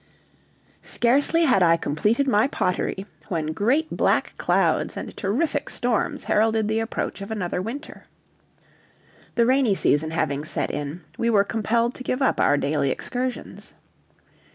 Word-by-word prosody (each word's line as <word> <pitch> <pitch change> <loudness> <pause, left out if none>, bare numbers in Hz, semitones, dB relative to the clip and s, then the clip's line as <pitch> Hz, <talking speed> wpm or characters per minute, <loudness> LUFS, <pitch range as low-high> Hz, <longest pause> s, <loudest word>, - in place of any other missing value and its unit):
Scarcely 285 +7 +2
had 250 -10 +3
I 165 -1 +5
completed 210 - 0
my 220 -1 +3
pottery, 190 -3 -2 0.2
when 160 -5 -2
great 265 - 0
black - - +1
clouds - - +1
and - - -7
terrific 280 +8 -1
storms 240 -3 -1
heralded 220 0 +2
the 220 +1 0
approach 225 -2 -3
of 200 - -7
another 180 -5 -2
winter. 255 +10 -7 1.3
The 235 - +3
rainy 255 -4 +3
season 155 -3 +2
having 145 -3 -1
set 155 - -2
in, 145 +4 -5 0.2
we 235 0 +1
were 205 -3 +4
compelled 230 +3 0
to 255 - -8
give 255 +2 -1
up - - +1
our 145 - +4
daily 145 -1 0
excursions. 250 - -4
220 Hz, 140 wpm, -24 LUFS, 175-250 Hz, 1.3 s, I